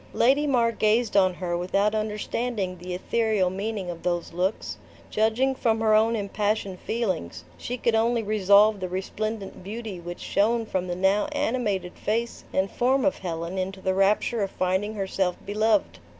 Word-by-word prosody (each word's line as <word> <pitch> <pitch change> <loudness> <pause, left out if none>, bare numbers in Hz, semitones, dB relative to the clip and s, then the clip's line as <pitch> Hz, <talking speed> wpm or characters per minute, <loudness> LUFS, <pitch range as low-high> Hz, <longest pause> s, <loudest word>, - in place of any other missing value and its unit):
Lady 275 +5 +3
Mar 240 -4 +3
gazed 220 0 +1
on 185 -2 +4
her 175 -2 -2
without 195 +4 +1
understanding 215 -2 -2
the 180 0 -5
ethereal 210 -1 +1
meaning 200 0 -3
of 170 - -9
those 175 -1 -2
looks. 185 +4 -2 0.3
Judging 225 +5 +2
from 225 -4 +1
her 220 -1 +3
own 220 +2 +4
impassioned 205 -2 -1
feelings, 185 - -3
she 245 - -5
could 235 -1 +1
only 230 +1 +2
resolve 205 0 +4
the 185 -1 -4
resplendent 195 +2 -4
beauty 210 -1 -6
which 175 +1 -7
shone 225 +3 +1
from 185 -3 -2
the 175 - -2
now 195 +7 +2
animated 215 -10 -1
face 230 +2 -2
and 190 +1 0
form 260 +3 +2
of 290 - +1
Helen 170 +1 -4
into 190 +1 -3
the 190 0 0
rapture 205 +4 +2
of 195 - 0
finding 190 +4 -1
herself 190 -2 -1
beloved. 210 - +1
205 Hz, 165 wpm, -26 LUFS, 185-225 Hz, 0.3 s, on